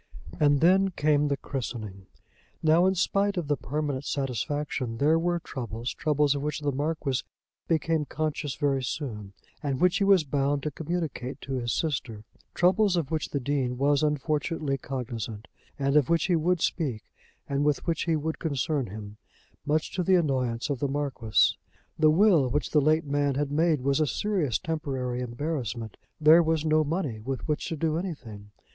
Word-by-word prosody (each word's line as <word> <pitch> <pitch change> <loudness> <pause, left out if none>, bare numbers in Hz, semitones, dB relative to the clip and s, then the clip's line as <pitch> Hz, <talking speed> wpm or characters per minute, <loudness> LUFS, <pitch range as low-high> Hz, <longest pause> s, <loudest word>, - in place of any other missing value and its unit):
And 145 -1 +4
then 190 +3 +5
came 150 -4 +2
the 140 -1 0
christening. 110 -9 -6 0.6
Now 165 +3 +5
in 190 - +2
spite 200 +2 +1
of 170 -4 -2
the 145 - +2
permanent 140 +1 -3
satisfaction 135 -2 -2
there 155 +5 +3
were 175 +1 0
troubles, 120 -6 -5
troubles 150 -2 +2
of 140 - -3
which 150 +1 -3
the 145 -1 0
Marquis 145 -1 -1 0.5
became 160 -1 +1
conscious 150 -2 -3
very 140 -3 +1
soon, 110 -7 -5 0.3
and 140 -3 -2
which 180 +3 +3
he 200 - +1
was 195 -4 +5
bound 140 0 0
to 150 - -2
communicate 150 -4 -4
to 135 - -5
his 120 -2 -1
sister, 125 -8 -2 0.3
troubles 185 +2 +3
of 160 -4 -2
which 155 -2 -1
the 140 - -1
Dean 130 -2 -1
was 140 +2 +2
unfortunately 150 0 0
cognisant, 120 -4 -5 0.3
and 140 0 0
of 145 -4 +4
which 165 -1 +2
he 180 - +2
would 170 +1 +1
speak 130 - -1 0.4
and 140 0 0
with 150 -1 +1
which 165 -3 -1
he 165 -1 +2
would 155 +1 -3
concern 145 -3 -1
him, 105 +1 -9 0.5
much 155 +1 +1
to 185 - -1
the 185 +2 +4
annoyance 130 -6 0
of 135 - -2
the 140 - 0
Marquis. 135 -7 +1 0.4
The 155 0 +6
will 165 -5 +4
which 145 +4 -1
the 150 - +4
late 155 +2 +2
man 145 -1 0
had 145 0 -1
made 155 -1 +2
was 140 +2 +1
a 155 - +2
serious 180 - 0
temporary 135 -7 -3
embarrassment. 120 -3 -4 0.2
There 155 +2 +7
was 160 -1 0
no 155 0 +3
money 150 - -2
with 130 +7 -5
which 150 -1 -1
to 165 - -3
do 160 +1 0
anything. 115 - -7
145 Hz, 175 wpm, -27 LUFS, 130-160 Hz, 0.6 s, There